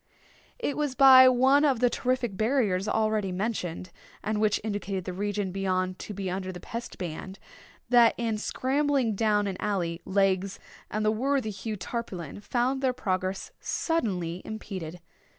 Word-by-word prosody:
It 375 - -2
was 295 -3 -1
by 260 -1 +9
one 265 +3 +4
of 275 -6 +3
the 250 - +4
terrific 245 -3 -1
barriers 215 -4 +1
already 215 -3 +1
mentioned, 180 -3 -3 0.3
and 215 0 -1
which 215 -1 +2
indicated 200 -3 -3
the 185 - -4
region 205 0 -2
beyond 185 -1 -1
to 210 - -6
be 195 -1 -4
under 185 +1 -3
the 180 - -8
Pest 235 +6 -7
ban, 185 +1 -6 0.5
that, 240 -2 +6
in 225 -3 -1
scrambling 270 0 0
down 210 0 +2
an 195 -2 -3
alley, 175 -5 -2
Legs 195 0 +1 0.3
and 215 0 -2
the 215 - +4
worthy 255 0 0
Hugh 210 +2 -5
Tarpaulin 185 - -5
found 250 +4 0
their 260 -2 +2
progress 185 -4 -2
suddenly 185 - -1
impeded. 185 -6 -6
210 Hz, 150 wpm, -27 LUFS, 185-245 Hz, 0.5 s, by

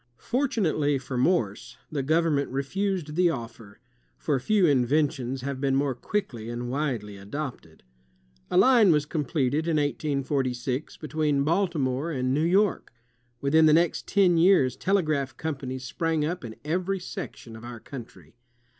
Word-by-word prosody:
Fortunately 200 - 0
for 130 0 -6
Morse, 125 - 0
the 145 -3 -1
government 155 0 +1
refused 155 +4 -2
the 180 0 +4
offer, 115 -7 -7 0.4
for 145 -4 0
few 195 +8 +3
inventions 135 -2 +1
have 135 0 -4
been 135 -1 +1
more 140 0 +1
quickly 120 - -4
and 120 +1 -4
widely 125 -8 -2
adopted. 105 - -7 0.7
A - - +1
line 230 -3 +6
was 150 -2 +2
completed, 150 -1 -1
in 165 -2 +1
1846, 140 -2 -1
between 150 -2 0
Baltimore 155 -4 0
and 130 -4 -1
New 145 - +1
York. 195 +4 +2 0.5
Within 155 +3 +4
the 155 - +6
next 170 +1 +2
ten 185 -4 +3
years, 165 -8 +4
telegraph 155 -6 0
companies 130 -4 -4
sprang 160 +3 -1
up 175 +1 -3
in 110 -2 -7
every 185 +5 -1
section 120 -9 -8
of 110 - -11
our 120 -1 -8
country. 110 - -11
145 Hz, 140 wpm, -26 LUFS, 130-165 Hz, 0.7 s, line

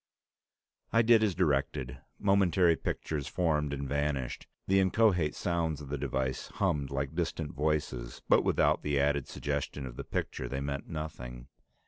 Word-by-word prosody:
I 115 +1 +4
did 115 -1 +6
as 105 -5 +2
directed. 70 -6 0 0.2
Momentary 95 -4 +4
pictures 75 -2 -3
formed 75 -5 +1
and 70 -1 -3
vanished. 70 -2 -2 0.2
The 95 0 +3
inchoate 95 -5 +3
sounds 80 -4 -1
of 70 -2 -9
the 75 - -2
device 65 -1 -2
hummed 70 -2 0
like 70 +1 -2
distant 80 -2 -2
voices, 70 -5 -2
but - - +5
without - - +3
the 70 -1 0
added 70 -1 +1
suggestion 70 - -3
of - - -8
the - - -4
picture, 65 - -3
they 65 - -2
meant 70 +1 -4
nothing. 65 -6 -6
75 Hz, 150 wpm, -31 LUFS, 70-85 Hz, 0.2 s, did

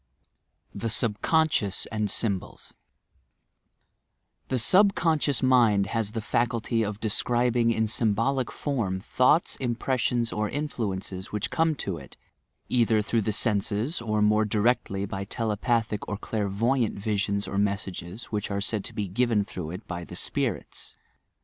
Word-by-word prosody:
SYMBOLISM - - -9
THE 115 - -1
SUBCONSCIOUS 110 - +1
AND 105 -2 -1
STUBOLISH 100 -4 -2 1.7
The 130 - 0
subconscious 165 - +3
miud 120 -6 +4
haa 115 +2 0
the 110 -1 -4
faculty 115 0 0
of 105 -1 -2
describing 120 +2 +1
in 110 -1 +1
symbolic 115 +4 0
form 110 -10 -2
thoughts, 130 - +2
impressions 120 -1 0
or 105 0 -1
influences 100 -9 -3
■which 105 -1 -3
come 165 -1 +2
to 95 -10 -3
it, 70 - -13 0.5
either 115 -3 +3
through 115 +1 +1
the 110 - -1
senses, 105 - 0
or 105 -2 0
more 105 +1 +4
directly 105 -2 +1
by 95 0 -4
telepathic 110 0 -1
or 105 - -3
clairvoyant 110 +4 0
visions 100 0 -1
or 100 - -1
mes 100 -1 +1
sages, 90 +3 -7
which 105 -2 -2
are 100 -1 -1
said 105 0 -1
to - - -5
be 105 -2 -2
given 110 +1 +1
through 90 -6 -6
it 90 +6 -7
by 85 -1 -5
the - - -9
"spirits." - - -3
110 Hz, 140 wpm, -27 LUFS, 100-120 Hz, 1.7 s, miud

